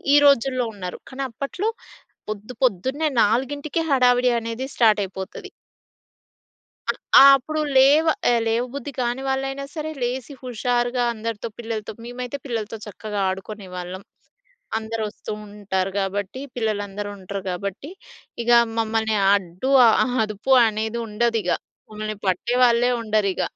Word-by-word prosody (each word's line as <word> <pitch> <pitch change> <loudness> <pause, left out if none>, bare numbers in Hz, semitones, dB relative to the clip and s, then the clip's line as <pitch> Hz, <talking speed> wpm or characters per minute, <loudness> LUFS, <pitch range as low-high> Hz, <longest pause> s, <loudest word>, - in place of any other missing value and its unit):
ఈ - - +8
రోజుల్లో 255 -2 +3
ఉన్నారు. 180 -3 -6
కానీ, 270 +1 -4
అప్పట్లో 275 - -3 0.6
పొద్దు, 215 +4 -6
పొద్దున్నే 260 - 0
4:00కే 285 +8 0
హడావిడి 250 -2 +4
అనేది 230 +3 -4
స్టార్ట్ 215 -3 +5
అయిపోతది. 190 0 -8 1.4
అ - - -9 0.3
ఆ! - - +10
అప్పుడు 310 +4 -3 0.2
లేవ 285 +5 +6 0.4
లేవ 230 +2 +1
బుద్ధి 280 0 -5
కాని 245 +2 -1
వాళ్ళైనా 270 +1 -2
సరే 315 0 -3
లేసి 250 +3 -3
హుషారుగా 245 0 0
అందరితో 225 0 -4
పిల్లలతో 225 -2 -4
మేమైతే 245 +3 -5
పిల్లలతో 225 -3 -3
చక్కగా 210 0 -5
ఆడుకునేవాళ్ళం. 185 -2 -6 0.8
అందరూ 225 0 -3
వస్తూ 215 - -8
ఉంటారు 195 -2 -3
కాబట్టి, 200 +5 -3
పిల్లలందరూ 205 -3 -2
ఉంటారు 195 +1 -6
కాబట్టి, 200 - -5 0.5
ఇగ 240 - -3 0.3
మమ్మల్ని 220 -1 +1 0.2
అడ్డు, 185 +5 -1 0.2
ఆహ్, 245 +3 +3
అదుపు 215 +4 -3 0.2
అనేది 220 +1 -2
ఉండదిగ. 220 -3 0 0.4
మమ్మల్ని 215 0 -5
పట్టే 210 +7 0
వాళ్ళే 245 0 +4
ఉండరిగ. 215 -4 0
225 Hz, 120 wpm, -23 LUFS, 205-255 Hz, 1.4 s, ఆ